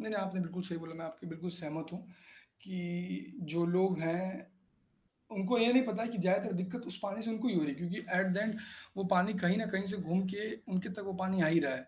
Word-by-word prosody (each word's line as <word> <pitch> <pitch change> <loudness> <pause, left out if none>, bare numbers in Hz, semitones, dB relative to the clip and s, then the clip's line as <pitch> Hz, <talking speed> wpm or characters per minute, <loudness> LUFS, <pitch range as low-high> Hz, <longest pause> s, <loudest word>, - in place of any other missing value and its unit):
नहीं, 220 - -4
नहीं, 210 -2 0
आपने 190 -1 -2
बिल्कुल 180 +1 -3
सही 170 -3 +1
बोला, 165 0 -9
मैं 165 0 -7
आपके 160 0 -9
बिल्कुल 165 +2 -5
सहमत 160 0 -5
हूँ 180 - -6 0.6
कि 180 -2 -5 0.2
जो 170 0 +3
लोग 185 0 +3
हैं। 180 +4 -2 0.9
उनको 205 +3 +1
ये 235 +1 +6
नहीं 260 +1 +7
पता 215 -1 -1
है - - -1
कि 230 - -5
ज़्यादातर 195 +3 +2
दिक्कत 185 +7 -3
उस 190 - +6
पानी 200 +1 -2
से 225 - -1
उनको 225 +3 -1
ही 240 - +1
हो 170 - +4
रही 150 - 0
है - - -4
क्योंकि 175 +3 -3 0.2
एट 190 - +3
द - - 0
एन्ड 215 +1 0 0.4
वो 195 - -1
पानी 185 +3 +4
कहीं 175 +3 +5
न 220 - 0
कहीं 190 0 0
से 210 - -3
घूम 180 0 +1
के 210 +1 -3 0.2
उनके 185 +2 0
तक 205 +2 -6
वो 195 - -3
पानी 190 -1 +2
आ 160 - +5
ही 165 +1 +6
रहा 140 -4 +1
है। 130 0 -6
185 Hz, 260 wpm, -34 LUFS, 170-205 Hz, 0.9 s, नहीं